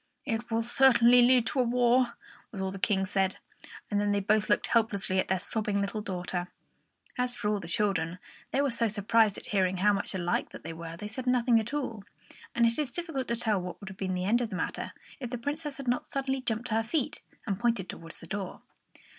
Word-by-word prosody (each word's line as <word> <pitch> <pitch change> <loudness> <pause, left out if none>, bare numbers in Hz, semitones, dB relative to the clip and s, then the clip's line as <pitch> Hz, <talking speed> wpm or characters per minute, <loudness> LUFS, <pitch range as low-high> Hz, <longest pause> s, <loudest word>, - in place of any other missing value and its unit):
"It 235 -2 -2
will 225 0 +1
certainly 245 -1 +6
lead 245 -1 +6
to 275 - -1
a - - +5
war," 245 0 +3 0.4
was 200 - -7
all 190 0 -1
the 195 - -7
King 190 -1 +2
said; 190 -1 0 0.5
and 205 0 +2
then 205 0 +1
they 205 - +2
both 210 +2 +2
looked - - +3
helplessly 200 -5 +1
at - - 0
their 190 - +2
sobbing 205 +1 -1
little 200 +2 -2
daughter. 180 -2 -3 0.7
As 250 0 0
for 210 - -1
all 210 -1 +1
the 170 - -8
children, 175 -2 0 0.3
they 275 - +1
were 280 - +1
so 230 0 +1
surprised 215 0 +3
at - - -8
hearing 190 -2 +1
how 205 +3 +4
much 200 0 -1
alike 175 -1 0
they 165 +2 -8
were 165 0 -7
that 165 - -11
they 210 - -4
said 255 +4 -6
nothing 245 -2 +4
at 225 +2 -4
all; 250 -8 -3 0.5
and 235 - +4
it 230 +4 +2
is 295 -4 0
difficult 325 -4 -3
to 235 - 0
tell 220 -5 +1
what 180 0 -6
would 200 - -8
have 190 - -10
been 185 -1 -1
the 180 0 -2
end 235 +5 +3
of 235 - -1
the 195 - -5
matter, - - -3 0.3
if 250 -3 -5
the 245 - -3
Princess 290 +3 -4
had 275 -2 -7
not 245 +1 0
suddenly 270 -1 -1
jumped 235 0 -2
to - - -1
her 225 0 +2
feet 290 +4 -1
again - - -29
and 195 -3 -2
pointed 235 -6 +1
towards 165 -1 -9
the - - -11
door. 195 +1 -5
220 Hz, 240 wpm, -29 LUFS, 195-245 Hz, 0.7 s, certainly